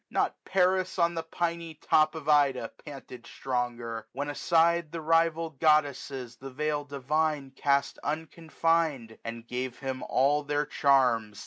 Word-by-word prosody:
not - - 0
Paris 185 0 +1
on 170 -1 +2
the 165 - -2
piny 165 0 -3
top 155 +1 +2
Of 155 -2 -7
Ida 140 -6 +3
panted 130 -4 -10
stronger, 120 -3 -3
when 145 +2 -3
aside 170 +1 +2
The 170 - -4
rival 165 0 +2
goddesses 140 -4 0
the 135 - -8
veil 150 +2 -2
divine 145 0 -1
^3^5 - - -36
Cast 140 -1 +1
unconfined, 160 -5 -1
and 115 0 -7
gave 125 0 -4
him 130 -1 -4
all 145 +3 +2
their 145 0 -1
charms. 125 -8 +2
145 Hz, 140 wpm, -28 LUFS, 130-160 Hz, -, Ida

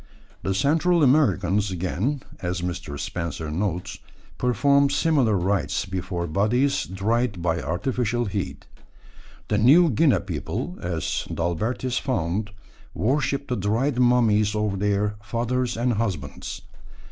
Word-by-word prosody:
The 95 - -1
Central 160 - +3
Americans, 105 - +3
again, 95 - -2 0.2
as 90 0 -3
Mr. 85 -5 -4
Spencer 80 -1 -4
notes, 90 +1 -3 0.4
performed 140 +3 +3
similar 140 -9 +2
rites 95 +2 0
before 95 -2 -3
bodies 110 - +1
dried 105 +3 0
by 85 -1 0
artificial 120 +5 -1
heat. 100 -2 -4 0.8
The 105 - +1
New 155 +9 +6
Guinea 140 +3 +3
people, 90 -1 -4
as 85 -3 -2
D'Albertis 110 +9 -1
found, 105 - -1 0.5
worship 140 - 0
the 125 - -1
dried 115 +7 0
mummies 110 -4 +3
of 105 -2 -1
their 105 +1 0
fathers 120 +3 -1
and 120 +1 +1
husbands. 95 -11 -4
105 Hz, 115 wpm, -24 LUFS, 90-125 Hz, 0.8 s, New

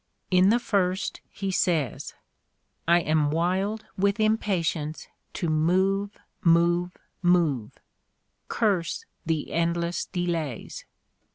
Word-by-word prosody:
In 185 +1 +5
the 230 - +5
first 195 -5 -1
he 195 -1 -4
says: 160 - 0 0.7
"I 170 +1 +5
am 155 -2 +2
wild 185 +7 0
with 200 +2 +2
impatience 180 -8 0 0.3
to 175 - -2
move 190 +6 +1 0.2
— - - -47 0.2
move 175 +1 0 0.2
— - - -46
move!... 165 -10 +2 0.7
Curse 195 -7 0 0.2
the 160 -2 -1
endless 170 +1 0
delays! 170 - -3
175 Hz, 105 wpm, -26 LUFS, 165-195 Hz, 0.7 s, In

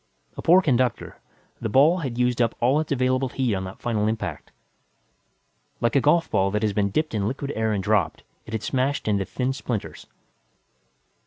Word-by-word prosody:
A - - -6
poor 180 +3 +5
conductor, 130 -5 0 0.4
the 115 - -3
ball 150 - +4
had 130 -7 -4
used 125 -1 +1
up 115 -1 +1
all 130 +5 +3
its 155 - -4
available 130 0 +1
heat 125 -4 -1
on 95 -1 -2
that 95 - -9
final 110 -3 -1
impact. 110 0 -4 1.3
Like 120 +2 0
a 140 - +5
golfball 125 - +2
that 105 +1 0
has 105 -2 +1
been 100 0 +1
dipped 155 +8 -1
in 105 -2 0
liquid 140 +4 -4
air 110 0 0
and 100 -2 -1
dropped, 105 -3 0 0.2
it 110 - -9
had 110 - -3
smashed 135 0 -1
into 100 -2 +1
thin 130 +5 -2
splinters. 120 -5 -5
120 Hz, 180 wpm, -24 LUFS, 105-135 Hz, 1.3 s, poor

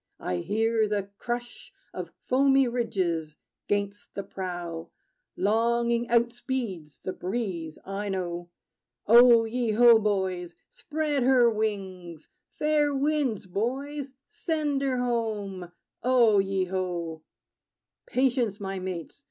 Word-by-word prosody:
I 90 - -2
hear 220 - +1
the 200 -1 -2
crush 240 0 -5 0.2
Of - - -5 0.2
foamy 270 0 +4
ridges 185 -10 -1 0.3
'gainst 205 0 -2
the 200 - -3
prow. 175 -4 -5 0.5
Longing 235 +2 +1
outspeeds 235 - -1
the 185 - -3
breeze, 180 -6 -4
I 200 +1 -4
know. 175 -2 -3 0.6
O 235 +1 +7
ye 230 -1 -1
ho, 235 0 +7
boys! 190 -4 -1
Spread 300 -2 -2
her 245 -2 +5
wings! 190 -7 -4 0.2
Fair 300 -1 +1
winds, 275 -7 0
boys: 265 +8 -3
send 310 -9 -2
her 265 -2 0
home! 215 -7 -2 0.3
O 240 -5 +4
ye 195 -1 0
ho! 175 -3 -3 0.9
Patience, 245 -5 +1
my 195 -1 -4
mates! 185 - -6
220 Hz, 110 wpm, -27 LUFS, 185-245 Hz, 0.9 s, O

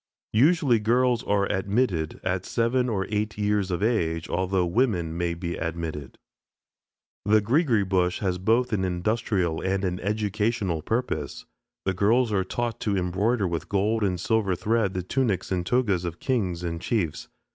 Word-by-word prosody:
Usually 135 0 +4
girls 120 +2 +2
are 100 -1 +2
admitted 95 -5 0
at 90 0 -1
seven 125 +3 +1
or 95 -4 -1
eight 105 0 -1
years 105 -2 0
of 90 +1 -1
age, 85 -8 0
although 95 0 0
women 85 -5 0
may 85 0 -1
be 85 0 -4
admitted. 80 -4 -5 1.1
The 110 +2 +4
"Greegree 115 - +2
Bush" 90 -1 +1
has 90 -3 -1
both 115 +5 +2
an 95 -3 +1
industrial 95 -1 0
and 95 +1 0
an 90 0 -2
educational 105 -3 -1
purpose. 80 - -3 0.4
The 95 - +1
girls 110 +6 +2
are 95 -2 +2
taught 120 +3 -3
to 100 -2 0
embroider 95 +4 +1
with 85 -2 -4
gold 105 +3 +1
and 90 -3 0
silver 105 -1 +1
thread 105 +1 0
the 90 - -2
tunics 105 -2 -1
and 90 -2 0
togas 100 -4 +1
of 85 -1 -5
kings 95 -10 -1
and 85 -1 -3
chiefs. 95 -10 -2
100 Hz, 155 wpm, -26 LUFS, 90-115 Hz, 1.1 s, Usually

